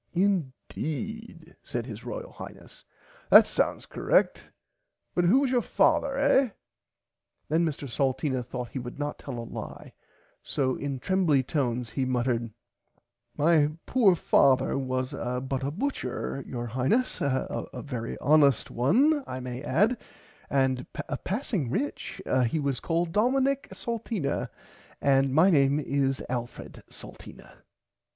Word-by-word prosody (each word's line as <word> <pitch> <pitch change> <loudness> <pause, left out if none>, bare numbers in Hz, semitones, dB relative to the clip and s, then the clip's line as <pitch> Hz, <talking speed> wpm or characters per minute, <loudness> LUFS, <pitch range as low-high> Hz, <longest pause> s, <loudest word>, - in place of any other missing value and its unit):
Indeed 180 - -3
said 120 -1 -4
his 115 -2 -8
royal 120 - -6
Highness - - -11 0.5
that - - +9
sounds - - -1
correct - - +1 0.6
but 175 - +2
who 240 +11 +5
was 270 -3 +1
your 245 -2 +3
father 275 +5 +2
eh. 275 -2 +4 1.0
Then 160 +3 +2
Mr 145 -2 -4
Salteena 130 0 -1
thourght 125 0 -6
he 135 - -5
would 120 +1 -7
not 145 0 -4
tell 135 -4 -6
a 115 - -5
lie - - -8 0.5
so 130 -2 -1
in 140 -2 -3
trembly 160 -2 +2
tones 125 -4 -1
he 135 - -1
muttered 120 -2 0 0.9
My 150 -1 +3
poor 220 -8 +4
father 135 -5 +3
was 130 -1 -2
but 125 +2 -3
a 135 - -1
butcher 145 - -3
your 120 -1 -4
Highness 130 - 0
a 130 -2 -1 0.2
very 120 -5 -4
honest 145 -4 +3
one 270 - +3
I 130 - -5
may 125 0 -6
add 215 - +1 0.5
and 130 -2 +1 0.4
passing 195 - -2
rich 280 - -3 0.3
he 160 - -1
was 140 -4 -1
called 170 0 -1
Domonic 265 +6 +1
Salteena 225 - -3 0.5
and 135 -1 +3
my 160 +8 +5
name 140 -2 +4
is 135 -2 0
Alfred 120 -1 -6
Salteena. - - -13
140 Hz, 130 wpm, -27 LUFS, 130-190 Hz, 1.0 s, that